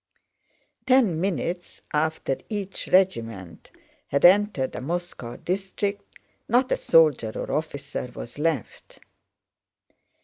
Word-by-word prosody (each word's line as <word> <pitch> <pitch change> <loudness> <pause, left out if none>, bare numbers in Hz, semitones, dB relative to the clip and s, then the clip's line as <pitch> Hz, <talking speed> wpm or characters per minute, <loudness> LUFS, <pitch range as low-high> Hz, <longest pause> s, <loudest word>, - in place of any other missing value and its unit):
Ten 235 -11 +4
minutes 175 -2 -3
after 155 -3 0
each 200 -3 -4
regiment 115 - 0 0.4
had 140 - +2
entered 190 -7 +4
a - - -4
Moscow 170 -5 -4
district, 195 +2 -3 0.3
not 250 +3 +3
a - - +3
soldier 150 -9 +4
or - - -4
officer 140 -3 -3
was 120 +4 -8
left. 155 -7 -3
165 Hz, 100 wpm, -25 LUFS, 140-195 Hz, 0.4 s, Ten